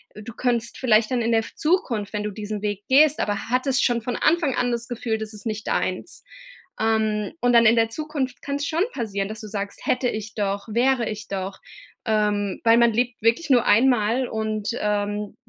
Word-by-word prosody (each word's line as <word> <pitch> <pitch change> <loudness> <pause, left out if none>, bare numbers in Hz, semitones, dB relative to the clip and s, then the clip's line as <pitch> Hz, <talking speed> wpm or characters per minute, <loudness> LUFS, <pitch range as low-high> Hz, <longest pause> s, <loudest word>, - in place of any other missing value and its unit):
du 215 +2 -9
könntest 235 -1 -1
vielleicht 220 -3 +3
dann 250 -2 +1
in 230 - 0
der 225 - +4
f - - -11
Zukunft, 245 - 0
wenn 210 0 -2
du 210 - -2
diesen 210 0 -5
Weg 205 -1 -3
gehst, 295 +3 +5
aber 205 +2 -2
hattest 255 +1 +1
schon 240 -1 +1
von 245 +1 -3
Anfang 320 -4 +2
an 245 0 0
das 235 0 -2
Gefühl, 235 -2 -2
das 220 0 -5
ist 210 +1 -6
nicht 220 0 -4
deins. 185 - -2 0.6
Ähm, 220 0 0
und 245 0 +3
dann 235 -1 +6
in 225 +2 +6
der 225 -1 +2
Zukunft 275 -1 -4
kann 280 0 -2
es 285 0 -3
schon 330 +3 +1
passieren, 200 -5 -3
dass 215 +1 -6
du 215 - -8
sagst: 200 -1 -5
„Hätte 250 -1 +1
ich 215 -1 -6
doch, 200 0 -2
wäre 245 +1 +2
ich 215 0 -6
doch“, 190 0 -4 0.5
ähm, 210 -2 0
weil 230 0 +5
man 235 -1 +4
lebt 245 +1 -1
wirklich 235 +8 +2
nur 245 -3 +4
einmal. 240 +1 +3
Und, 215 -2 -3
ähm, 205 0 -2
225 Hz, 205 wpm, -23 LUFS, 210-245 Hz, 0.6 s, dann